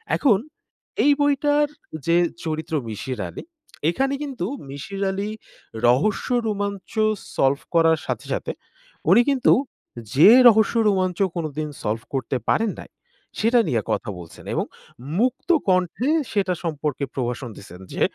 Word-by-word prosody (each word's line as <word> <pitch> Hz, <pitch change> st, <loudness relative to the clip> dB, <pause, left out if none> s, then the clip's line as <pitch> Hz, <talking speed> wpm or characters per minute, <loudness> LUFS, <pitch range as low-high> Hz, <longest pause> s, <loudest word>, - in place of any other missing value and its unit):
এখন 235 Hz, -9 st, +4 dB, 0.7 s
এই 290 Hz, -, +5 dB
বইটার 290 Hz, +1 st, +3 dB, 0.4 s
যে 170 Hz, -, +4 dB, 0.3 s
চরিত্র, 160 Hz, 0 st, -4 dB, 0.2 s
মিশির 110 Hz, +3 st, -5 dB
আলি -, -, -8 dB, 0.5 s
এখানে 270 Hz, +9 st, 0 dB
কিন্তু 265 Hz, -11 st, -4 dB, 0.2 s
মিশির 145 Hz, +8 st, -6 dB
আলির 200 Hz, +3 st, -3 dB, 0.5 s
রহস্য 140 Hz, -, +2 dB, 0.2 s
রোমাঞ্চ 200 Hz, -2 st, -3 dB, 0.4 s
সলভ 135 Hz, +1 st, +2 dB
করার 165 Hz, -1 st, +4 dB
সাথে, -, -, -3 dB
সাথে -, -, -3 dB, 0.6 s
উনি -, -, +7 dB
কিন্তু 270 Hz, -3 st, +4 dB, 0.6 s
যে 155 Hz, +9 st, +8 dB, 0.2 s
রহস্য 220 Hz, -1 st, +5 dB
রোমাঞ্চ 185 Hz, -3 st, +1 dB, 0.2 s
কোনদিন 155 Hz, -2 st, -3 dB
সলভ 110 Hz, +2 st, -1 dB
করতে 130 Hz, 0 st, -1 dB
পারেন 225 Hz, -2 st, +2 dB
নাই। -, -, -10 dB, 0.5 s
সেটা 235 Hz, +2 st, +4 dB
নিয়ে 120 Hz, -7 st, +1 dB
কথা 115 Hz, -, -2 dB
বলছেন 85 Hz, -2 st, -12 dB
এবং -, -, 0 dB, 0.5 s
মুক্তকণ্ঠে 240 Hz, -, +1 dB, 0.2 s
সেটা 195 Hz, -3 st, +1 dB
সম্পর্কে 150 Hz, -4 st, -2 dB
প্রভাষণ 125 Hz, 0 st, -3 dB
দিছেন 90 Hz, -2 st, -12 dB
যে, -, -, -5 dB
180 Hz, 125 wpm, -23 LUFS, 140-225 Hz, 0.7 s, যে